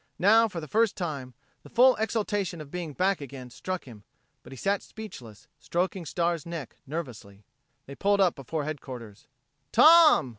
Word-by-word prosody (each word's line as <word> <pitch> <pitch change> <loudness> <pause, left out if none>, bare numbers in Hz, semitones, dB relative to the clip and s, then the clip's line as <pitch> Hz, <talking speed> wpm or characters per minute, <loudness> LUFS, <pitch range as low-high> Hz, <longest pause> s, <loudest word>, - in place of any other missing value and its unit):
Now, 225 +5 +5
for 180 -5 -6
the 155 - -8
first 220 +4 +2
time, 140 - -5 0.3
the - - -15
full 255 +2 +5
exultation 205 -5 -1
of 150 -2 -10
being 170 -4 -5
back 185 +2 +1
again 130 -2 -9
struck 185 +7 -5
him; 110 -5 -13 0.4
but - - -15
he 135 - -9
sat 200 +8 0
speechless, 120 - -11
stroking 180 0 -2
Star's 170 -2 -1
neck 165 -6 -7
nervously. 115 -10 -7 0.4
They 140 - -9
pulled 200 +7 +1
up 185 -3 +4
before 145 +3 -4
headquarters. 130 -8 -8 0.4
"Tom!" 310 - +7
170 Hz, 160 wpm, -27 LUFS, 135-200 Hz, 0.4 s, Tom